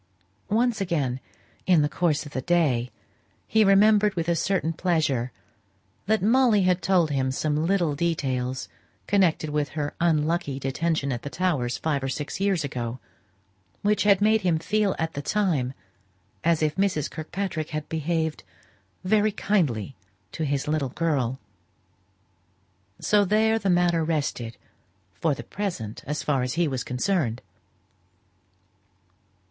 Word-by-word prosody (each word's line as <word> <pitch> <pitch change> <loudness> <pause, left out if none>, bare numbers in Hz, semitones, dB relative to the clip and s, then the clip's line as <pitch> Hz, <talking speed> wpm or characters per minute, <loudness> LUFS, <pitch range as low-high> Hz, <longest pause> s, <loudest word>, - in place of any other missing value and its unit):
Once 225 0 +1
again, 145 -9 -1 0.5
in 175 -5 +5
the - - +2
course 155 -1 0
of 145 - -10
the 130 - -3
day, 135 -7 +1 0.6
he 220 0 +4
remembered 205 +1 +5
with 165 -1 -2
a 170 - +2
certain 165 -1 0
pleasure 155 -8 0 0.8
that 220 -2 +2
Molly 230 -2 +4
had 180 0 +2
told 180 -5 +2
him 135 -2 0
some 150 +4 0
little 175 -5 +2
details 130 - -1 0.4
connected 175 -6 +2
with 150 -2 0
her 145 -1 -2
unlucky 160 -3 +1
detention 140 +2 -1
at 120 -1 -3
the 145 - -6
Towers 150 -9 -1
five 150 -3 -1
or 135 - -1
six 145 +5 -4
years 195 -5 +1
ago, 125 -3 -4 0.8
which 210 +1 +2
had 200 -1 +4
made 215 +1 +4
him 175 -4 +2
feel 205 +4 0
at 160 0 -2
the 140 - -4
time 160 -9 0 0.7
as 165 -1 +2
if 155 +2 0
Mrs. 185 -7 +1
Kirkpatrick 160 0 -4
had 155 -1 -4
behaved 160 0 -2 0.6
very 210 +3 +3
kindly 145 - 0 0.4
to 160 - -3
his 140 -1 -1
little 150 -3 0
girl. 135 -4 -1 1.6
So 210 -1 +3
there 220 +3 +2
the 200 - -1
matter 175 -2 +3
rested 140 -7 -2 0.6
for 155 - 0
the 120 - -8
present, 125 - -5
as 150 +1 -2
far 140 -3 +1
as 125 +2 -2
he 170 0 +2
was 130 -3 -2
concerned. 125 - -1
160 Hz, 140 wpm, -25 LUFS, 140-190 Hz, 1.6 s, in